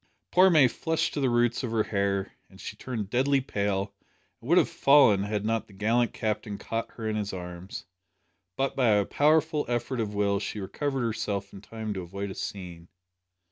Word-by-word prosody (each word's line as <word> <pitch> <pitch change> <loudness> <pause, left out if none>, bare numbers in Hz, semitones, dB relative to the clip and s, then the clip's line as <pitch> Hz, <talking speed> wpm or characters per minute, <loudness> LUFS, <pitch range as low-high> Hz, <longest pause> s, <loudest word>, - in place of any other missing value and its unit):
Poor 185 +1 +6
May 155 -7 +6
flushed 160 +6 -1
to - - -2
the 135 -2 +2
roots 120 0 +2
of 125 - -3
her 110 -1 +1
hair; 100 -2 -1 0.2
then - - -17
she - - -7
turned 110 -6 -5
deadly 135 +3 +3
pale, 100 -5 -2 0.5
and - - -10
would - - +5
have - - +5
fallen 140 -8 +5
had 105 0 -2
not 115 0 -1
the 100 - -17
gallant 115 +4 +1
Captain 105 -1 -3
caught 115 +2 -4
her 110 -2 -5
in 110 - -1
his 105 -1 -2
arms. 90 0 -7 0.7
But 135 +5 -1
by 130 -3 +2
a 105 -2 +4
powerful 155 +3 +2
effort 120 +1 -2
of 105 -2 -2
will 100 -1 +1
she 105 +1 -4
recovered 135 +7 -2
herself 105 -3 -3
in 95 - -10
time 110 0 -5
to 95 - -4
avoid 100 +3 -5
a - - -5
scene. 90 -5 -7
110 Hz, 195 wpm, -27 LUFS, 100-125 Hz, 0.7 s, Poor